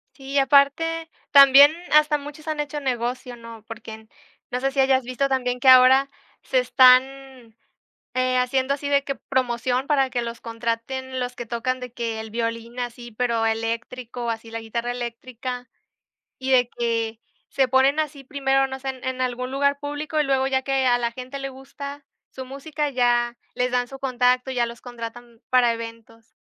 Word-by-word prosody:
Sí, 275 0 -5
aparte 290 +4 +3 0.2
también 280 +1 +9 0.2
hasta 300 0 +5
muchos 295 +2 -11
han 305 -1 -3
hecho 295 0 -3
negocio, 245 -1 -3
¿no?, 230 -2 -11
porque, 225 0 -9
n 220 0 -12 0.4
no 250 - -1
sé 270 +1 0
si 270 0 +2
hayas 265 -1 +3
visto 255 +3 -1
también 250 -2 -1
que 265 - +6
ahora 260 +2 +7 0.3
se - - +1
están, 260 - +3 0.6
eh, 255 0 +1
haciendo 260 +2 +1
así 285 0 -4
de 280 -1 +2
que 275 - -3
promoción 255 +1 -1
para 270 -3 +2
que 245 - -2
los 235 -1 -6
contraten 240 +3 -4
los 250 0 -4
que 240 - -5
tocan, 245 +3 -2
de 250 -2 -8
que 230 -2 -3
el 220 0 -7
violín 230 +1 -4
así, 240 -1 -6
pero 235 -1 0
eléctrico, 230 +2 -3
así 225 0 -5
la 230 - -4
guitarra 235 +2 -3
eléctrica, 245 +1 -6 0.7
y 260 0 -3
de 250 -2 +4
que 230 -1 -1 0.3
se 265 -2 +2
ponen 270 +3 +3
así 290 -3 -5
primero, 270 -1 +1
no 265 0 -7
sé, 270 - -5
en 260 -1 -6
en 260 0 -3
algún 255 0 -2
lugar 280 +1 +1
público, 290 +2 -4
y 300 - +3
luego 270 -1 +1
ya 265 0 0
que 270 -1 0
a 245 -1 +4
la 235 -1 -2
gente 255 +3 -7
le 275 0 -5
gusta 280 +2 -9 0.3
su 260 - -8
música, 290 +3 -4
ya 240 -2 +1 0.2
les 250 0 0
dan 245 0 0
su 270 +1 -11
contacto, 250 0 +1
ya 245 -2 0
los 235 0 -9
contratan 235 -1 -9
para 245 -2 +4
eventos. 230 0 -10
255 Hz, 180 wpm, -23 LUFS, 235-270 Hz, 0.7 s, también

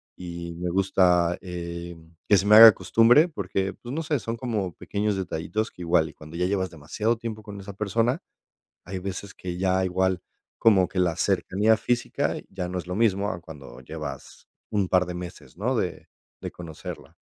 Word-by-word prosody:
y 85 -1 -7
me 90 +1 -3
gusta, 90 -2 +3
eh, 85 -1 -6 0.3
que 100 - +7
se 95 - 0
me 105 +1 +7
haga 115 0 +12
costumbre, 115 - +4
porque, 95 - -2
pues, 120 +2 -9
no 160 - -1
sé, 155 -2 0
son 115 0 -4
como 105 -8 -2
pequeños 105 -1 -2
detallitos 95 +5 -2
que 90 - -13
igual, 85 -2 +2
y - - -14
cuando 80 +2 -11
ya 90 - +1
llevas 95 -1 0
demasiado 85 +9 -2
tiempo 110 -2 -6
con 100 -1 -9
esa 100 0 -8
persona, 115 - 0 0.6
hay 95 +2 -5
veces 95 +1 -6
que 90 -1 -6
ya 95 0 +2
igual 95 0 0 0.4
como 95 -5 +5
que 95 - -2
la 85 -3 +1
cercanía 105 +4 +2
física 120 +3 -1
ya 90 -2 -5
no 90 - -3
es 90 - -6
lo 90 - -4
mismo 100 -1 +2
a 85 - -5
cuando 70 -8 -11
llevas - - -8 0.2
un 100 -3 +1
par 90 -1 +3
de 90 - -5
meses, 90 -1 -9
¿no?, 125 +7 -1
de 90 -6 -3 0.3
de - - -6
conocerla. 85 -3 -9
95 Hz, 190 wpm, -25 LUFS, 90-105 Hz, 0.6 s, haga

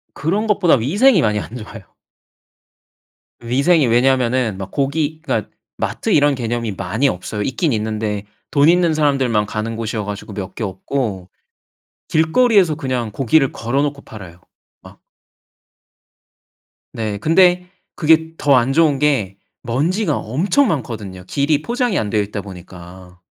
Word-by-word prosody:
그런 200 +9 -1
것보다 200 -5 +3
위생이 180 - +3
많이 105 -3 +1
안 110 - -8
좋아요. 110 -2 -9 1.6
위생이 135 +5 +2
왜냐하면은 125 -3 +2
막 95 -1 -7
고기 150 +3 -1
그니까 - - -2 0.3
마트 225 - -2
이런 145 -3 +4
개념이 115 -3 -3
많이 100 +9 -1
없어요. 105 +1 -4
있긴 130 - -1
있는데 105 -1 -2 0.3
돈 145 +2 +4
있는 175 -2 +3
사람들만 135 -8 +1
가는 110 +2 -4
곳이어 110 -1 -3
가지고 105 0 -7
몇 95 -2 -6
개 - - -4
없고 95 -1 -4 0.8
길거리에서 180 +1 +3
그냥 130 -7 -3
고기를 135 +4 +2
걸어놓고 140 +4 -2
팔아요. 90 -5 -12 0.4
막. - - -16 1.9
네. 110 -3 -3
근데 180 - +3 0.3
그게 160 0 +2
더 140 -2 +3
안 125 +3 +1
좋은 150 -4 +3
게 115 -11 0 0.3
먼지가 150 - 0
엄청 185 - +1
많거든요. 110 - -4
길이 145 +7 0
포장이 240 0 -1
안 105 - -1
되어 105 -1 +1
있다 100 0 -4
보니까. 90 -1 -12
130 Hz, 295 characters per minute, -18 LUFS, 105-155 Hz, 1.9 s, 이런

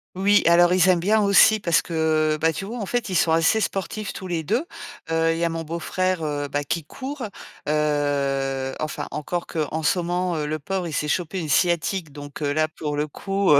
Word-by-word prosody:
Oui, 200 +2 +4
alors 175 +1 +6
ils 185 0 +4
aiment 180 -2 +4
bien 210 +5 +3
aussi 205 +2 +6
parce 170 -4 +2
que, 155 -2 +1
bah, 165 0 +3
tu 195 - -5
vois, 235 +3 -6
en 200 - -4
fait, 245 -4 -1
ils 185 - -2
sont 165 -1 +3
assez 165 +7 +3
sportifs 200 +2 -3
tous 190 - -8
les 170 -3 -2
2, 235 - 0 0.5
heu, 165 0 +2
il - - -3
y 170 - -1
a 170 - +2
mon 165 0 -3
beau-frère, 170 +2 -2
heu, 145 -1 -2
bah 145 +1 -2
qui 165 +2 -2
court, 265 - -6 0.4
heu, 140 -3 0
enfin, 155 0 -4
encore 170 +4 -3
que 165 - -5
en 160 0 -3
ce 180 - +2
ment, 175 0 -1
le 155 +1 -2
pauvre, 185 +2 -3
il 155 - -6
s'est 150 - -1
chopé 180 +3 -1
une 160 - -4
sciatique, 170 0 +1
donc 145 +1 -9
heu, 145 -1 0
là, 155 +1 +2
pour 150 -2 -5
le 150 - +1
coup, 195 +3 0
heu, 140 - +7
165 Hz, 225 wpm, -23 LUFS, 150-185 Hz, 0.5 s, heu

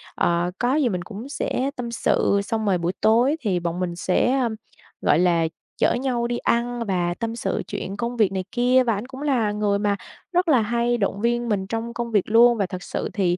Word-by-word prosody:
ờ, 175 +1 +1
có 250 +3 +2
gì 285 -6 +2
mình 180 -3 -2
cũng 220 +7 -8
sẽ 275 -1 -2
tâm 240 -1 -5
sự, 200 -3 +2
xong 220 +1 -2
rồi 190 -3 +2
buổi 170 +2 -1
tối 240 +7 +4
thì 195 -7 0
bọn 170 +1 -3
mình 175 -2 -2
sẽ, 245 +9 +1
um, 230 -3 0 0.5
gọi 150 - +3
là, 170 -2 +3 0.3
chở - - +3
nhau 245 -2 -1
đi 240 0 -2
ăn 240 0 0
và 175 -2 0
tâm 230 0 -3
sự 200 -5 -2
chuyện 195 +2 -5
công 240 +2 -3
việc 205 -4 +3
này 190 -1 -2
kia, 250 +1 +3
và 230 -2 +1
ảnh 205 +4 -4
cũng 265 +1 -9
là 250 -8 +1
người 205 -1 0
mà 205 -1 +1 0.4
rất 355 +1 +2
là 265 -8 +5
hay 235 +2 0
động 200 -1 -1
viên 240 0 0
mình 190 -2 -1
trong 230 +2 -4
công 235 -1 -4
việc 205 -3 +1
luôn. 235 +1 +6
Và 200 - +1
thật 180 -1 -7
sự - - -3
thì, 180 -4 +1
225 Hz, 230 wpm, -23 LUFS, 190-240 Hz, 0.5 s, luôn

